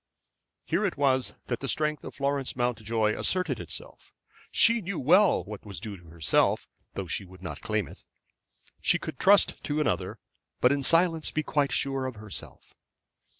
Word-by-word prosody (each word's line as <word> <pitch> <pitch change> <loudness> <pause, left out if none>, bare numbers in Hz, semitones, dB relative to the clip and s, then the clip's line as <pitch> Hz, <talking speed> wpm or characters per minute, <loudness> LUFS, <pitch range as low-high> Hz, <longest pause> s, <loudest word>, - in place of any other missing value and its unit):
Here - - 0
it 195 -7 -1
was 130 -2 +1
that 120 - -3
the 135 - -4
strength 150 0 0
of - - -8
Florence 140 -1 -1
Mountjoy 115 -3 0
asserted 180 -10 -1
itself. 85 - -9 0.4
She 230 0 +5
knew 195 -1 -4
well 180 +8 +4
what 105 -1 -9
was 100 -5 -7
due 105 +2 -4
to 90 -3 -16
herself, 80 -2 +2 0.3
though - - -3
she - - -3
would 95 0 -15
not 85 - -6
claim 110 -4 -1
it. - - -13 0.8
She - - +4
could 125 - -7
trust 200 +1 +4
to 145 +1 -1
another, 90 - -1 0.4
but 125 - +5
in 140 0 +1
silence 165 +2 +3
be 155 - -1
quite 145 -2 +1
sure 135 -1 0
of 130 - -6
herself. 105 -1 -9
130 Hz, 170 wpm, -28 LUFS, 105-155 Hz, 0.8 s, She